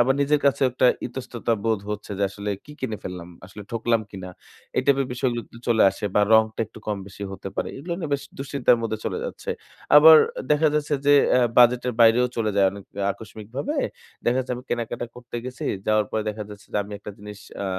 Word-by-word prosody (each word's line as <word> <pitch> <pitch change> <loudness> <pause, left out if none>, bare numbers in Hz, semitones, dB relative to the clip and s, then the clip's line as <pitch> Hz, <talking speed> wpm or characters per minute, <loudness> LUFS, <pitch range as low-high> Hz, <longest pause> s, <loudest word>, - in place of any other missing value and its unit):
আবার 130 +3 +4
নিজের 145 +1 +2
কাছে 140 0 +2
একটা 125 +1 +2 0.2
ইতস্ততা 120 -2 -3
বোধ 110 -3 +1
হচ্ছে 105 0 -5
যে, - - 0
আসলে 100 +1 -5
কি 150 - -12
কিনে 115 -5 -3
ফেললাম, 90 -1 -7 0.2
আসলে 105 +2 -10
ঠকলাম 115 0 +1
কিনা? 95 -2 -8 0.5
এই - - +3
টাইপের 140 -1 +3
বিষয়গুলো 120 -1 -1 0.3
চলে 115 -2 +4
আসে - - -8
বা - - +5
রংটা 110 0 +4
একটু 110 - -14
কম 105 -1 -1
বেশি 100 +1 -10
হতে 95 0 -7
পারে। - - -1
এগুলো 160 +6 -5
নিয়ে 160 -5 -4
বেশ 140 - -3 0.2
দুশ্চিন্তার 135 -2 +2
মধ্যে 110 -1 -2
চলে - - -2
যাচ্ছে। - - -5 0.5
আবার 160 +2 +10 0.3
দেখা 150 +1 +4
যাচ্ছে 150 0 0
যে, 145 - +6 0.3
আ - - +4 0.2
বাজেটের 125 +1 +5
বাইরেও 115 +2 +6
চলে 110 -2 0
যায় 100 - +5
অনেক 100 0 -10 0.3
আকস্মিকভাবে। 110 - -6 0.5
দেখা 120 +1 +2
যাচ্ছে 130 -1 -2
আমি 125 - -10
কেনাকাটা 120 0 -2
করতে 120 -1 -8
গেছি। 130 0 -6 0.2
যাওয়ার 110 -1 +3
পরে 110 - -1
দেখা 105 0 -4
যাচ্ছে 105 0 -12
যে, - - -1
আমি 105 - -10
একটা 105 - -8
জিনিস 105 0 -10 0.2
আ - - -2
120 Hz, 200 wpm, -24 LUFS, 105-130 Hz, 0.5 s, আবার